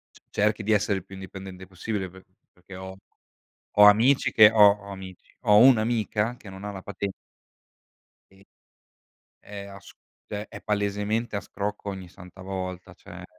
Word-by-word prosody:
c - - -18
cerchi 105 +1 0
di 110 - 0
essere 105 -1 +2
il 85 - -11
più 95 - -13
indipendente 95 -1 -9
possibile 95 +1 -4
pe 95 +1 -16 0.3
perché 90 +1 -15
ho 95 0 -8 0.8
ho 105 - +8
amici 115 +7 +5
che 110 -1 +8
ho 105 -2 +8 0.2
ho 100 - -9
amici 95 -1 -11
ho 105 0 +5
un'amica 115 -2 +3
che 105 - -13
non 95 +1 -10
ha 105 - -4
la 95 - -8
paten 100 0 -5 1.2
e, 95 +1 -22 0.9
è 100 -1 -9
a - - -13
s - - -12 0.4
cioè 105 0 -5
è - - -8
palesemente 105 +2 -1
a - - -2
scrocco 100 +1 -5
ogni 95 -2 -8
santa 90 +1 -14
volta, 95 -1 -6
cioè. - - -12
100 Hz, 165 wpm, -26 LUFS, 95-105 Hz, 1.2 s, ho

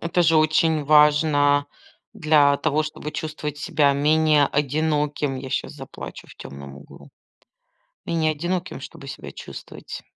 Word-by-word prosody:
Это 170 +1 0
же 165 -1 +4
очень 155 0 +2
важно, 145 -1 +4 0.5
для 145 -2 +3
того 155 0 0
чтобы 150 0 -6
чувствовать 155 -1 -5
себя 145 -2 +2
менее 150 +1 +3
одиноким. 150 -1 -1
Я 130 0 -7
щас - - -3
заплачу 135 -3 -10
в - - -15
темном 70 0 -10
углу. 70 - -15 1.0
Менее 160 -2 +1
одиноким, 175 +4 -4
чтобы - - -11
себя - - -8
чувствовать. - - -10
150 Hz, 130 wpm, -23 LUFS, 145-155 Hz, 1.0 s, же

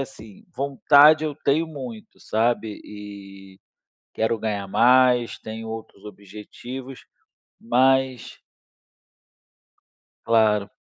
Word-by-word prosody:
assim, 110 -6 -10
vontade 145 +3 +4
eu 150 -2 -3
tenho 155 +2 0
muito, 130 -8 -10
sabe, 110 -1 -1
e 100 -2 -12 0.6
quero 110 +1 -1
ganhar 105 -2 -4
mais, 125 +1 +3
tenho 110 +1 -8
outros 110 -2 -9
objetivos, 105 +6 -10 0.6
mas 130 +1 +1 1.9
Claro. 105 -3 +2
115 Hz, 85 wpm, -23 LUFS, 105-130 Hz, 1.9 s, vontade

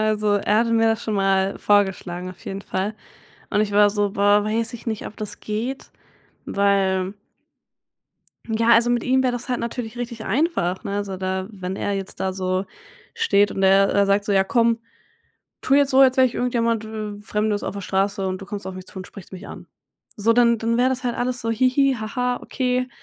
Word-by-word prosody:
Also 215 -1 +1
er 210 +1 +2
hatte 230 0 +1
mir 225 0 +3
das 225 0 0
schon 215 - -2
mal 195 0 +1
vorgeschlagen 185 -3 0
auf 180 - -15
jeden 195 +1 -5
Fall. 195 +4 -3 0.6
Und 210 - +2
ich 205 -1 0
war 205 0 +5
so 205 -1 0
boah, 205 +1 +3
weiß 225 +2 0
ich 235 - -10
nicht, 220 -2 -3
ob - - -10
das 210 -1 -6
geht, 230 +6 -4 0.6
weil 195 -1 +1 1.4
Ja, 225 +1 +2
also 235 +1 +5
mit 240 -1 0
ihm 260 +1 +3
wäre 255 - +2
das 245 +1 -5
halt 250 - -1
natürlich 235 -1 -5
richtig 235 -2 -5
einfach, 200 - 0
ne? 200 - -3
Also 200 -2 -3
da 190 0 -3
wenn 185 -1 -5
er 205 - -2
jetzt 195 -1 -5
da 190 - -1
so 185 0 -1 0.5
steht 205 - +2
und 195 - -3
er 195 +1 +5
er 200 0 +3
sagt: 200 +1 +2
„So, 205 - 0
ja 195 -1 +4
komm, 230 +2 +2 0.8
tu 270 - +2
jetzt 285 0 +4
so, 265 - +3
als 270 - +9
jetzt 255 - -6
wäre 260 - +6
ich 250 - -5
irgendjemand 230 -2 0
w 215 -1 -6
Fremdes 210 0 -1
auf - - -4
der 200 - -5
Straße 195 +1 0
und 185 +1 -3
du 195 - -9
kommst 200 -2 -6
auf 190 - -5
mich 185 0 -9
zu - - -14
und 185 - -7
sprichst 195 -2 -13
mich 185 - -9
an.“ - - -10 0.5
So, 220 +2 +3
dann 235 0 +4
dann 230 +1 0
wäre 250 - +4
das 260 -1 -3
halt 240 - 0
alles 245 0 -2
so: 230 - -1
„Hihi, 255 +4 +3
ha 215 +3 -6
ha, 250 0 +1
okay, 255 -1 -1
210 Hz, 220 wpm, -22 LUFS, 195-235 Hz, 1.4 s, als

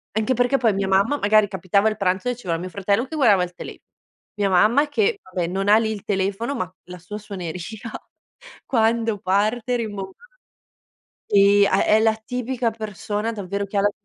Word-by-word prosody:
Anche 220 +4 +1
perché 245 +2 +2
poi 230 -5 +2
mia 195 0 -1
mamma, 200 +9 +2
magari 215 -2 +3
capitava 195 +2 +1
il 215 - 0
pranzo 190 +2 -1
e 245 - 0
c'era 180 -8 -3
mio 180 +2 -6
fratello 200 +5 0
che 315 - -8
guardava 210 -10 +4
il 180 0 -6
tele - - -9 0.6
mia 205 -1 0
mamma 220 +11 +4
che 420 +7 +1
vabbè 180 -2 -3
non 195 +3 -2
ha 210 - +7
lì 220 -1 0
il 210 -3 -6
telefono 200 +7 -1
ma 185 -5 -4
la 180 0 -9
sua 195 +5 -8
suoneria 185 -5 -6 1.0
quando 225 -2 +1
parte 215 +6 0
rimbom 205 -4 -5 1.2
sì 200 0 +5
ha 195 - +2
è 215 - +4
la 220 0 +4
tipica 245 +1 -2
persona 215 0 -4
davvero 200 -1 -4
che 200 +1 -5
ha - - +3
la 205 - +2
205 Hz, 185 wpm, -22 LUFS, 195-230 Hz, 1.2 s, ha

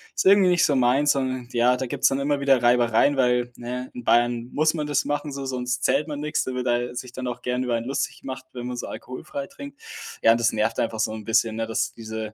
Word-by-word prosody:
ist - - -1
irgendwie 195 -1 +6
nicht 175 -1 +3
so 145 - +2
meins“, 130 +4 +3
und 130 -2 -3
ja, 120 +1 +4
da 130 -1 -3
gibt‘s - - +2
dann 135 - -1
immer 145 0 0
wieder 135 -3 +3
Reibereien, 120 +3 +3
weil, 125 -1 +2
ne, 125 +1 -5
in 125 - -8
Bayern 120 0 +2
muss 155 +2 +2
man 150 -2 -3
das 145 -2 +1
machen 145 0 -2
so, 135 -1 -5
sonst 125 -1 -3
zählt 140 +4 +2
man 145 -1 -5
nix, 150 0 -1
da 130 - -4
wird 125 0 -2
da 120 0 0
sich 125 0 -6
dann 130 -1 -5
auch 125 0 -5
gern 125 +1 -1
über 120 -1 0
einen 115 0 -3
lustig 135 - -3
gemacht, 130 -1 -7
wenn 120 -1 -6
man 125 -1 -5
so - - -5
alkoholfrei 275 - -7
trinkt. 280 +1 -11 0.4
Ja, 115 - +7
und 115 - 0
das 115 -1 +2
nervt 110 +1 0
einfach 110 -1 -1
so 110 - 0
‘n 110 -2 -8
bisschen, 110 0 +1
ne, 115 0 -2
dass 115 0 -1
diese, 110 -1 -6
125 Hz, 260 wpm, -24 LUFS, 120-140 Hz, 0.4 s, Ja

